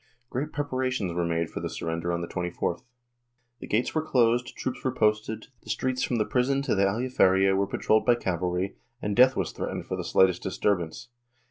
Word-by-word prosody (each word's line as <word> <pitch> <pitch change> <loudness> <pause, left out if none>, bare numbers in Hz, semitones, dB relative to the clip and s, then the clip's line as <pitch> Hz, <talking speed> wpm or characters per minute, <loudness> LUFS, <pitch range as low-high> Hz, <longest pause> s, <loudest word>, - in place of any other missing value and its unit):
Great 145 +5 -2
preparations 130 -9 -1
were 85 0 0
made 85 0 0
for - - -4
the - - -3
surrender 85 +1 -3
on 85 0 -1
the 85 - -4
24th. 90 -1 -2 0.8
The - - -8
gates 110 +4 0
were 155 - +1
closed, 120 -5 +2
troops 130 - -3
w^re 130 -1 -2
posted, 110 0 0
the - - -15
streets 130 -1 -1
from 125 - 0
the 110 -2 +1
prison 135 +2 +1
to 140 - 0
the 100 -1 +3
Aljaferia 95 -3 +3
were 100 0 +1
patrolled 110 +2 +1
by 120 - +6
cavalry, 90 -2 -2 0.2
and 105 -3 -2
death 130 +2 +6
was - - -1
threat - - -4
ened - - -5
for - - -3
the - - -4
slightest 95 -2 +3
disturbance. 95 +2 -1
105 Hz, 200 wpm, -27 LUFS, 90-125 Hz, 0.8 s, by